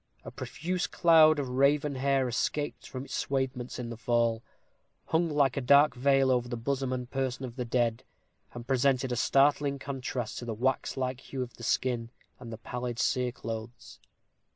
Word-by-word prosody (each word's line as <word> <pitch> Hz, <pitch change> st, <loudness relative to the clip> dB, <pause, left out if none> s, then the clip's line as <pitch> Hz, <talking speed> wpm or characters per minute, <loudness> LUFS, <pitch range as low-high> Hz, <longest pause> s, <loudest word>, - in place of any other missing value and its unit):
A -, -, -7 dB
profuse 175 Hz, +1 st, -3 dB
cloud 160 Hz, -2 st, +5 dB
of 140 Hz, -2 st, -2 dB
raven 140 Hz, +3 st, +2 dB
hair, 135 Hz, 0 st, +1 dB
escaped 125 Hz, +1 st, -2 dB
from 130 Hz, +1 st, -6 dB
its -, -, -9 dB
swathements 130 Hz, -2 st, -2 dB
in 120 Hz, -1 st, -5 dB
the -, -, -5 dB
fall, 115 Hz, -1 st, +1 dB, 0.6 s
hung 165 Hz, +1 st, +1 dB
like 140 Hz, -4 st, +2 dB
a 140 Hz, -, -1 dB
dark 140 Hz, +2 st, +5 dB
veil 135 Hz, +1 st, +3 dB
over 125 Hz, -1 st, +1 dB
the 120 Hz, -, -3 dB
bosom 135 Hz, +2 st, -2 dB
and 125 Hz, -1 st, -3 dB
person 130 Hz, 0 st, -3 dB
of 120 Hz, -2 st, -9 dB
the 125 Hz, -2 st, -3 dB
dead, 120 Hz, -1 st, 0 dB, 0.5 s
and 120 Hz, -1 st, -8 dB
presented 130 Hz, 0 st, +1 dB
a -, -, 0 dB
startling 140 Hz, +2 st, +3 dB
contrast 130 Hz, -4 st, -4 dB
to 120 Hz, -, -7 dB
the 115 Hz, -2 st, -4 dB
waxlike 130 Hz, +1 st, -1 dB
hue 135 Hz, -1 st, -5 dB
of 125 Hz, -, -10 dB
the -, -, -14 dB
skin 120 Hz, -1 st, 0 dB, 0.3 s
and 120 Hz, -2 st, -9 dB
the 110 Hz, -, -6 dB
pallid 125 Hz, +1 st, -5 dB
cereclothes. 120 Hz, -2 st, -3 dB
130 Hz, 175 wpm, -29 LUFS, 120-140 Hz, 0.6 s, cloud